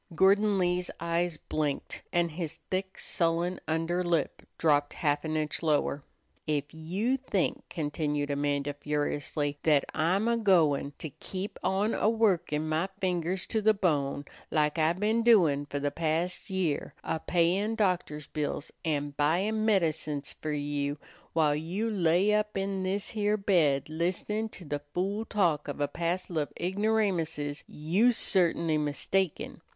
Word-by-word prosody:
Gordon 200 Hz, +3 st, +4 dB
Lee's 180 Hz, -1 st, +1 dB
eyes 170 Hz, 0 st, 0 dB
blinked, 150 Hz, -2 st, -3 dB
and 170 Hz, -1 st, +1 dB
his 165 Hz, -1 st, -4 dB, 0.2 s
thick, 190 Hz, 0 st, -2 dB
sullen 170 Hz, +1 st, 0 dB
under 165 Hz, +3 st, 0 dB
lip 170 Hz, -4 st, 0 dB, 0.2 s
dropped 145 Hz, -2 st, +2 dB
half 145 Hz, -2 st, 0 dB
an 155 Hz, -1 st, -1 dB
inch 155 Hz, -1 st, -1 dB
lower. 150 Hz, -3 st, +1 dB, 0.4 s
"Ef 145 Hz, -1 st, -1 dB
you 190 Hz, +11 st, -1 dB
think," 230 Hz, -9 st, -1 dB
continued 145 Hz, -2 st, -2 dB
Amanda, 145 Hz, 0 st, 0 dB
furiously, 145 Hz, 0 st, -2 dB
"that 150 Hz, -3 st, +3 dB
I'm 180 Hz, +7 st, +1 dB
a 235 Hz, 0 st, +2 dB
goin' 160 Hz, -10 st, +3 dB
to 155 Hz, -, -6 dB
keep 185 Hz, +7 st, -6 dB
on 200 Hz, +4 st, +1 dB
a 215 Hz, -, +2 dB
workin' 185 Hz, -9 st, +1 dB
my 160 Hz, +4 st, 0 dB
fingers 180 Hz, 0 st, -1 dB
to 220 Hz, -, -1 dB
the 215 Hz, +1 st, +4 dB
bone, 145 Hz, -7 st, 0 dB, 0.2 s
lak 150 Hz, +1 st, +1 dB
I 160 Hz, +1 st, +3 dB
been 215 Hz, +5 st, +1 dB
doin' 170 Hz, -12 st, +4 dB
for 145 Hz, -, -4 dB
the 145 Hz, 0 st, -1 dB
past 165 Hz, +3 st, -1 dB
year, 185 Hz, -6 st, -1 dB
a 160 Hz, -, -2 dB
payin' 180 Hz, +7 st, +1 dB
doctors' 180 Hz, -8 st, 0 dB
bills, 150 Hz, 0 st, -3 dB
an' 145 Hz, -3 st, -1 dB
buyin' 190 Hz, +10 st, +1 dB
medicines 160 Hz, -8 st, 0 dB
fer 155 Hz, -, -5 dB
you, 145 Hz, 0 st, -2 dB, 0.4 s
while 155 Hz, -3 st, +3 dB
you 180 Hz, +9 st, -2 dB
lay 185 Hz, +1 st, +3 dB
up 210 Hz, -1 st, 0 dB
in 195 Hz, 0 st, -1 dB
this 195 Hz, +2 st, -2 dB
here 210 Hz, -2 st, +1 dB
bed 165 Hz, -9 st, +2 dB
listenin' 180 Hz, +7 st, -2 dB
to 185 Hz, -, -11 dB
the 145 Hz, 0 st, -2 dB, 0.2 s
fool 200 Hz, +5 st, -1 dB
talk 170 Hz, -10 st, +1 dB
of 145 Hz, -, -5 dB
a 145 Hz, -, +1 dB
passel 170 Hz, 0 st, -2 dB
of 145 Hz, -, -2 dB
igneramuses, 180 Hz, -7 st, 0 dB
you's 200 Hz, +11 st, +2 dB
certainly 170 Hz, -4 st, +2 dB
mistaken. 155 Hz, +4 st, -1 dB
170 Hz, 145 wpm, -29 LUFS, 150-195 Hz, 0.4 s, Gordon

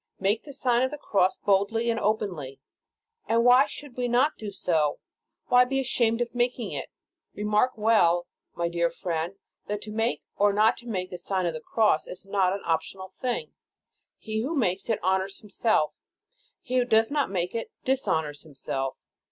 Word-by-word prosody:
Make 200 Hz, +4 st, +1 dB
the 290 Hz, -, -8 dB
Sign 250 Hz, -3 st, +2 dB
of 260 Hz, -, +2 dB
the 295 Hz, -, -6 dB
Cross 195 Hz, -8 st, +1 dB
boldly 210 Hz, +4 st, +2 dB
and 230 Hz, -, -1 dB
openly. 180 Hz, -11 st, -2 dB, 0.7 s
And 230 Hz, +1 st, +3 dB
why 250 Hz, +3 st, +7 dB
should 285 Hz, -4 st, -8 dB
we 250 Hz, -1 st, -1 dB
not 255 Hz, +6 st, +3 dB
do 215 Hz, -, -6 dB
so. 165 Hz, -6 st, 0 dB, 0.5 s
Why 250 Hz, 0 st, +7 dB
be 270 Hz, +2 st, -1 dB
ashamed 235 Hz, -3 st, +1 dB
of 240 Hz, -, -2 dB
making 245 Hz, -1 st, -1 dB
it? -, -, -5 dB, 0.5 s
Remark 210 Hz, +4 st, +2 dB
well, 190 Hz, -6 st, +3 dB, 0.3 s
my 170 Hz, -, 0 dB
dear 170 Hz, 0 st, +1 dB
friend, 170 Hz, +1 st, -3 dB, 0.3 s
that 210 Hz, 0 st, -2 dB
to 215 Hz, -, -8 dB
make, 225 Hz, +2 st, -1 dB
or 205 Hz, 0 st, +3 dB
not 215 Hz, +3 st, +3 dB
make 190 Hz, -6 st, -4 dB
the 180 Hz, -, -6 dB
Sign 185 Hz, 0 st, -1 dB
of 170 Hz, -, 0 dB
the 155 Hz, -, -6 dB
Cross, 215 Hz, -4 st, +2 dB
is 185 Hz, -, -8 dB
not 195 Hz, -2 st, +2 dB
an 200 Hz, +1 st, -3 dB
optional 180 Hz, +3 st, -2 dB
thing. 250 Hz, -, -3 dB, 0.6 s
He 220 Hz, -1 st, -4 dB
who 290 Hz, +8 st, -2 dB
makes 195 Hz, -6 st, 0 dB
it 225 Hz, -, +2 dB
honors 190 Hz, +1 st, +1 dB
himself; 210 Hz, -5 st, 0 dB, 0.7 s
he 255 Hz, -1 st, -1 dB
who 250 Hz, -, +3 dB
does 225 Hz, 0 st, +3 dB
not 290 Hz, -1 st, +1 dB
make 180 Hz, -2 st, -2 dB
it, 230 Hz, -1 st, -3 dB, 0.2 s
dishonors 160 Hz, -, 0 dB
himself. 135 Hz, -3 st, -4 dB
210 Hz, 175 wpm, -27 LUFS, 180-240 Hz, 0.7 s, why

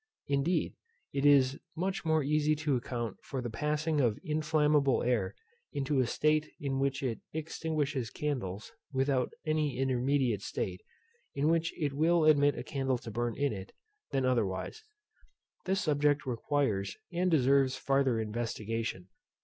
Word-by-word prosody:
Indeed, 140 Hz, +6 st, +1 dB, 0.4 s
it 140 Hz, +1 st, +2 dB
is 140 Hz, -2 st, +5 dB, 0.2 s
much 190 Hz, +3 st, -2 dB
more 160 Hz, -1 st, +3 dB
easy 150 Hz, +1 st, +2 dB
to 150 Hz, -2 st, 0 dB
account 120 Hz, -3 st, -3 dB
for 135 Hz, -, -4 dB
the 120 Hz, -2 st, -4 dB
passing 150 Hz, +4 st, 0 dB
of 115 Hz, -5 st, +2 dB
inflammable 150 Hz, -3 st, +2 dB
air 110 Hz, -6 st, 0 dB, 0.4 s
into 140 Hz, 0 st, 0 dB
a 125 Hz, -, +2 dB
state 155 Hz, +3 st, +1 dB
in 135 Hz, -2 st, -2 dB
which 135 Hz, 0 st, 0 dB
it 120 Hz, -4 st, -1 dB
extinguishes 150 Hz, -5 st, -2 dB
candles, 125 Hz, -, -3 dB, 0.2 s
without 135 Hz, -1 st, +1 dB
any 155 Hz, -4 st, 0 dB
intermediate 130 Hz, -3 st, +1 dB
state, 90 Hz, -2 st, -3 dB, 0.5 s
in 145 Hz, +3 st, +2 dB
which 165 Hz, 0 st, +2 dB
it 145 Hz, -3 st, 0 dB
will 160 Hz, +3 st, +3 dB
admit 145 Hz, -2 st, +5 dB
a 120 Hz, -, -4 dB
candle 135 Hz, -2 st, -1 dB
to 115 Hz, -, -8 dB
burn 120 Hz, +1 st, -2 dB
in 140 Hz, -3 st, +1 dB
it, 95 Hz, -1 st, -8 dB, 0.4 s
than 135 Hz, -1 st, 0 dB
otherwise. 115 Hz, -, -1 dB, 0.8 s
This 190 Hz, +1 st, +1 dB
subject 145 Hz, -1 st, +2 dB
requires 120 Hz, -5 st, -1 dB, 0.2 s
and 180 Hz, +2 st, +1 dB
deserves 135 Hz, -3 st, +4 dB
farther 135 Hz, -2 st, +1 dB
investigation. 110 Hz, -3 st, -3 dB
140 Hz, 140 wpm, -31 LUFS, 120-150 Hz, 0.8 s, is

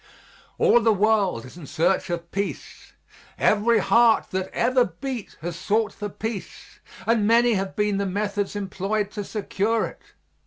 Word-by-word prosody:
All 240 Hz, -, +5 dB
the 225 Hz, 0 st, +4 dB
world 205 Hz, -, +1 dB
is 130 Hz, -, -13 dB
in 160 Hz, -5 st, -10 dB
search 175 Hz, +6 st, +1 dB
of 170 Hz, -1 st, -4 dB
peace; 200 Hz, +1 st, -5 dB, 0.4 s
every 225 Hz, +2 st, +3 dB
heart 230 Hz, 0 st, +3 dB
that 190 Hz, 0 st, -2 dB
ever 255 Hz, 0 st, +2 dB
beat 235 Hz, +5 st, -6 dB
has 170 Hz, +1 st, -4 dB
sought 215 Hz, +5 st, 0 dB
for 205 Hz, -1 st, -5 dB
peace, 220 Hz, +1 st, -7 dB, 0.3 s
and 225 Hz, -2 st, +2 dB
many 235 Hz, +1 st, +4 dB
have 195 Hz, -1 st, -2 dB
been 210 Hz, -1 st, +1 dB
the 200 Hz, 0 st, -1 dB
methods 205 Hz, +1 st, -2 dB
employed 200 Hz, +1 st, -2 dB
to 210 Hz, -1 st, -5 dB
secure 215 Hz, +2 st, -1 dB
it. -, -, -10 dB
205 Hz, 155 wpm, -24 LUFS, 190-225 Hz, 0.4 s, All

